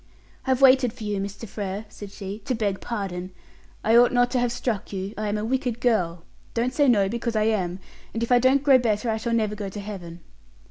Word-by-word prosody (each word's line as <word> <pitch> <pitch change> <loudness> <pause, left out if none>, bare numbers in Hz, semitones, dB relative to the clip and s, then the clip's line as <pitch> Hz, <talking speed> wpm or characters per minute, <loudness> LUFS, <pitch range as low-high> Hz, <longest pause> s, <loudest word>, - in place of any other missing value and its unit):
"I've 260 0 +2
waited 260 -3 +6
for - - -10
you, 205 -1 -2
Mr. 200 +3 -5
Frere," 200 +1 -5
said 205 -1 -10
she, 195 +1 -7
"to 255 - 0
beg 205 -4 -1
pardon. 190 -6 -4 0.5
I 220 +2 +4
ought 240 +1 +7
not 245 0 +3
to 255 - +1
have 245 -1 +1
struck 240 -4 -3
you; 195 +1 -4
I 215 0 -3
am 205 - -1
a 210 - -2
wicked 250 -1 -1
girl. 180 -9 +1 0.3
Don't 240 +2 0
say 290 -2 +3
no, 205 -6 +4
because 235 +2 -3
I 215 - +3
am; 190 -5 0 0.3
and 230 - -2
if 235 - -3
I 245 - +6
don't 265 +3 +3
grow 275 -3 +6
better 225 -1 0
I 220 - 0
shall 230 +1 -2
never 215 -2 +1
go 205 -2 -5
to 205 - -7
Heaven." 180 -5 -8
220 Hz, 230 wpm, -25 LUFS, 200-245 Hz, 0.5 s, ought